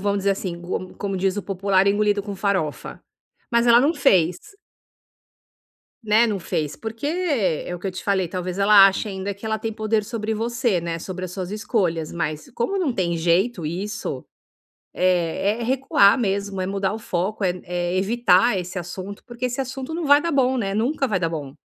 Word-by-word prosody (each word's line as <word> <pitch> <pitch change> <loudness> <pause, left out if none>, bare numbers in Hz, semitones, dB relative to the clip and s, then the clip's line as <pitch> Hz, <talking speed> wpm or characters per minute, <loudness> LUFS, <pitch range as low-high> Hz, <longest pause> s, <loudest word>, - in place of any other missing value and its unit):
vamos 200 +1 0
dizer 200 0 +1
assim, 185 -3 -3
co 185 +1 -5
como 195 -1 -3
diz 190 +1 0
o 205 - -2
popular: 195 0 +1
"Engolido 205 0 +2
com 200 0 -6
farofa". 190 -6 -2 0.5
Mas 235 0 +3
ela 235 0 +7
não 295 +6 +2
fez. 180 - +3 1.6
Né, 220 +2 +4
não 205 -2 -1
fez, 150 -4 -3
porque, 225 +3 -7
é 280 - 0
o - - -6
que 180 - -6
eu - - -2
te 185 - -8
falei, 190 -3 +1
talvez 180 +1 -4
ela 200 -1 +8
ache 195 +2 0
ainda 195 0 -4
que 200 - -14
ela 220 0 -1
tem 225 0 -3
poder 215 0 0
sobre 220 -1 -3
você, 230 -2 0
né, 170 0 -3
sobre 185 +1 -5
as 180 - -6
suas 185 -1 -5
escolhas, 195 -7 -1
mas 155 -3 -3
como 390 +13 -1
não 330 -9 0
tem 175 -6 -1
jeito 175 +3 +1
isso, 200 +7 -4 0.7
eh, 185 +4 +1
é - - -3
recuar 250 -4 +4
mesmo, 200 -3 -1
é 185 - -2
mudar 195 0 -1
o 220 - -5
foco, 200 +2 -2
é 185 - +3
n 180 0 -4
é 175 +1 -2
evitar 235 +3 +3
esse 180 +1 -6
assunto, 185 +3 -7
porque 240 0 -5
esse 250 +1 -3
assunto 265 +2 -4
não 335 0 -3
vai 285 0 +6
dar 335 - -1
bom, 265 -3 +2
né, 200 -5 -1
nunca 270 +5 0
vai 205 -5 0
dar 165 -2 0
bom. 145 -4 -6
200 Hz, 200 wpm, -23 LUFS, 180-230 Hz, 1.6 s, ela